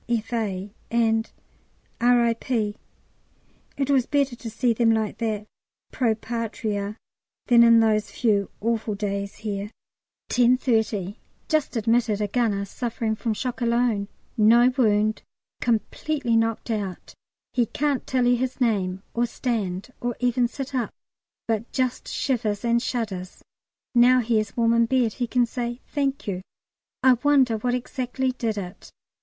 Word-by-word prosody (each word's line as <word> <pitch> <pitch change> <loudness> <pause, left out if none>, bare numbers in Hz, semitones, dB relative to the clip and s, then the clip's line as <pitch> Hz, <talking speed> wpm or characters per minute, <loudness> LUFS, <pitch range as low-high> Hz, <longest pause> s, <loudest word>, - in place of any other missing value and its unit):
F.A.," 215 -4 -2 0.2
and 225 -1 +2 0.7
R.I.P. 235 -2 +2 1.0
It 275 -1 -1
was 265 -3 +3
better 280 -3 +1
to 235 -1 -7
see 230 +2 +1
them 230 0 +2
like 220 0 0
that 215 -3 -2 0.5
Pro 230 -4 +1
Patria 220 -2 -3 0.5
than 240 -1 +6
in 230 -1 +7
those 215 -2 +2
few 205 -5 +1
awful 225 -1 -1
days 200 -1 -3
here. 205 -1 -4 0.6
10.30. 230 -5 +2 0.3
Just 310 -4 0
admitted 225 -1 +2
a 210 - 0
gunner 205 -3 0
suffering 230 +1 -3
from 220 0 -2
shock 250 +3 -4
alone 235 -3 +1 0.3
no 235 +3 +5
wound 215 -3 +2 0.4
completely 240 +2 0
knocked 225 +1 0
out; 200 -4 -4 0.4
he 240 -3 +2
can't 285 +1 -1
tell 255 -2 +1
you 245 0 +4
his 255 +1 -3
name, 195 -6 0
or 240 +1 +1
stand, 220 -3 -3
or 240 -1 -2
even 245 0 +2
sit 270 +2 -7
up, 250 -3 0 0.6
but 225 0 -1
just 255 -2 -1
shivers 225 -5 -1
and 235 0 +3
shudders. 205 -8 -4 0.5
Now 250 +1 +6
he 225 -1 +2
is 215 - -4
warm 230 -1 +3
in 230 0 +3
bed, 245 -3 +2
he 245 - -2
can 245 +1 +2
say 240 0 -4
"Thank 280 -2 -2
you." 185 -3 -3 0.6
I 260 -1 +6
wonder 270 -6 +4
what 245 +3 0
exactly 255 +1 -2
did 230 -4 -2
it. 185 -1 -7
230 Hz, 140 wpm, -24 LUFS, 215-245 Hz, 1.0 s, in